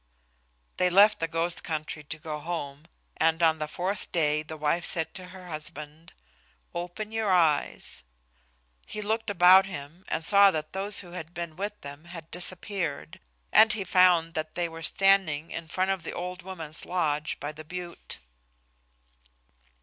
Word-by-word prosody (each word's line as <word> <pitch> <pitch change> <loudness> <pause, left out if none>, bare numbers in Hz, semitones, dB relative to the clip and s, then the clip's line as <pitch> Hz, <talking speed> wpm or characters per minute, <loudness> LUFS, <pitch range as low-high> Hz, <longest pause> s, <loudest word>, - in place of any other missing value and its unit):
They 180 - +3
left 205 +4 +6
the 165 - 0
ghost 165 +2 -1
country 155 -1 -4
to 150 +2 -5
go 155 -2 -6
home, 150 -3 -5 0.3
and 165 +1 +2
on 160 -1 +4
the 155 - -2
fourth 185 +5 -3
day 150 -2 +2
the 155 +1 -8
wife 155 +3 0
said 165 -1 +3
to 185 -1 -6
her 185 0 -12
husband, 155 0 -6 0.6
"Open 180 +5 -5
your 220 -2 -1
eyes." 155 - +1 0.9
He - - -6
looked 220 +1 -1
about 185 0 +7
him 170 -1 -8
and 160 - -1
saw 200 -1 +7
that 155 -3 -4
those 195 +2 +1
who 175 -3 -13
had 175 -1 -8
been 170 -2 -5
with 205 +3 -4
them 145 +3 -10
had 165 -2 -10
disappeared, 175 -3 -2 0.3
and 220 +1 +7
he 215 -4 -2
found 180 -3 +4
that 155 -1 -4
they 175 -1 0
were 165 0 -9
standing 170 -3 +3
in 165 0 -6
front 185 +4 0
of 190 -2 -2
the 160 - -6
old 180 +1 -5
woman's 165 -4 -4
lodge 155 -4 -1
by 145 +1 -4
the 155 +1 -11
butte. 175 +2 -7
170 Hz, 165 wpm, -27 LUFS, 155-185 Hz, 0.9 s, about